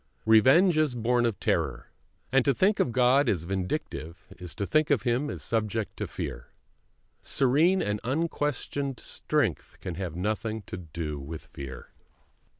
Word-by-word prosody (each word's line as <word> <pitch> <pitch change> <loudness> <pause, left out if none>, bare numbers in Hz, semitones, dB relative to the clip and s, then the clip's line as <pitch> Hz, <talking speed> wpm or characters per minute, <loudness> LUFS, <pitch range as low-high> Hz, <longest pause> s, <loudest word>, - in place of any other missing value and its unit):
Revenge 135 - +6
is 150 -5 +1
born 120 +1 +2
of 115 - -3
terror, 70 -7 -1 0.4
and 135 -1 +4
to 140 -1 +2
think 200 - +3
of 125 - +2
God 125 +2 +4
as 85 -6 0
vindictive 90 - -4
is 90 -3 -7
to 100 - -2
think 155 +6 +2
of 140 -7 +2
Him 125 +5 0
as - - -6
subject 110 -1 -1
to - - -3
fear. - - -6 0.7
Serene 155 +8 +3
and 105 0 -1
unquestioned 140 -1 -2
strength - - -2
can 90 - -5
have 90 -2 -5
nothing 110 +3 -2
to - - -7
do 80 -3 -5
with 75 +3 -7
fear. 65 -2 -8
115 Hz, 155 wpm, -28 LUFS, 90-140 Hz, 0.7 s, Revenge